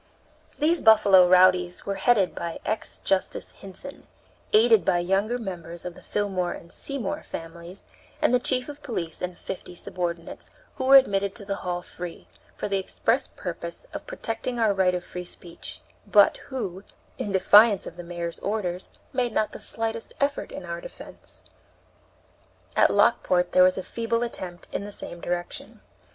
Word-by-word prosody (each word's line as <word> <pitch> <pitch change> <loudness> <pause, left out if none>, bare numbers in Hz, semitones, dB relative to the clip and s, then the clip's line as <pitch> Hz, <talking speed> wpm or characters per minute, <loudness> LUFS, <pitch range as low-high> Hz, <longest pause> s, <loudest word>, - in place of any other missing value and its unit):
These 325 +3 +2
Buffalo 205 -5 +7
rowdies 180 -1 +4
were 200 - -1
headed 195 -1 +3
by 170 -1 -5
ex 215 - -1
Justice 190 -1 -1
Hinson, 195 +9 -10 0.4
aided 225 -2 +6
by 175 - +2
younger 195 +7 +1
members 175 -6 -7
of 180 - -4
the - - -14
Fillmore 190 -4 -1
and 170 - -11
Seymour 275 -8 -2
families, 170 +3 -9 0.4
and 305 -4 +3
the 250 - +5
chief 250 0 0
of 295 -1 -9
police 170 - -4
and 180 -1 -4
fifty 180 -1 -7
subordinates, 170 -1 -4 0.3
who 260 - -2
were 270 +1 +8
admitted 200 -7 +4
to 200 - -9
the 200 0 -2
hall 175 -1 -3
free, 175 -1 -8 0.3
for - - -3
the 200 -1 0
express 240 +6 0
purpose 170 -1 -7
of - - -7
protecting 250 - -3
our 220 -3 +3
right 185 -2 +2
of 180 - -3
free 180 0 -7
speech, 175 -1 -10 0.3
but - - +6
who, 195 -8 -4 0.4
in 205 - -2
defiance 205 +2 +6
of - - -8
the 175 - -7
mayor's 170 -1 -5
orders, 190 -4 -3 0.2
made 250 -2 +1
not 215 - +1
the - - -8
slightest 225 0 -3
effort 285 0 0
in - - -7
our - - -5
defense. - - -8 1.3
At - - +5
Lockport 180 -1 +3
there 185 - +5
was 185 0 +5
a 190 - -3
feeble 230 +2 -1
attempt 180 -7 -5
in - - -3
the 205 - -7
same 175 -3 -7
direction. 175 0 -4
195 Hz, 165 wpm, -26 LUFS, 175-230 Hz, 1.3 s, were